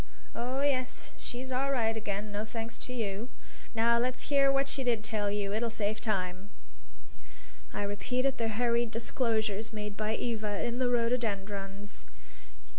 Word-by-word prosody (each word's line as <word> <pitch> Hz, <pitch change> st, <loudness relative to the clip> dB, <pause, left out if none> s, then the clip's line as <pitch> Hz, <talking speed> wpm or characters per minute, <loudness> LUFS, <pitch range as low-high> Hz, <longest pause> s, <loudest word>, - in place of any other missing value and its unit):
Oh, 255 Hz, +3 st, -1 dB
yes, 255 Hz, -3 st, +1 dB
she's 255 Hz, +2 st, -4 dB
all 270 Hz, +2 st, +1 dB
right 225 Hz, -4 st, +2 dB
again; 210 Hz, -1 st, -2 dB
no 205 Hz, +1 st, -1 dB
thanks 225 Hz, +1 st, -4 dB
to -, -, -6 dB
you. 225 Hz, -1 st, -2 dB, 0.5 s
Now 235 Hz, +1 st, +5 dB
let's 250 Hz, +1 st, 0 dB
hear 275 Hz, -1 st, +6 dB
what 275 Hz, 0 st, +3 dB
she 275 Hz, -1 st, +1 dB
did 235 Hz, -4 st, +2 dB
tell 215 Hz, -2 st, 0 dB
you. 200 Hz, -1 st, 0 dB
It'll 230 Hz, +2 st, +1 dB
save 215 Hz, -1 st, -1 dB
time." 190 Hz, -2 st, -1 dB, 1.2 s
I -, -, -2 dB
repeated 250 Hz, +7 st, 0 dB
the 230 Hz, -, +2 dB
hurried 235 Hz, +1 st, +2 dB
disclosures 225 Hz, -2 st, 0 dB
made 210 Hz, -2 st, -4 dB
by 215 Hz, +1 st, 0 dB
Eva 215 Hz, -4 st, -1 dB
in 240 Hz, +1 st, -1 dB
the 255 Hz, -1 st, +3 dB
rhododendrons. 205 Hz, -4 st, -1 dB
225 Hz, 150 wpm, -32 LUFS, 205-245 Hz, 1.2 s, hear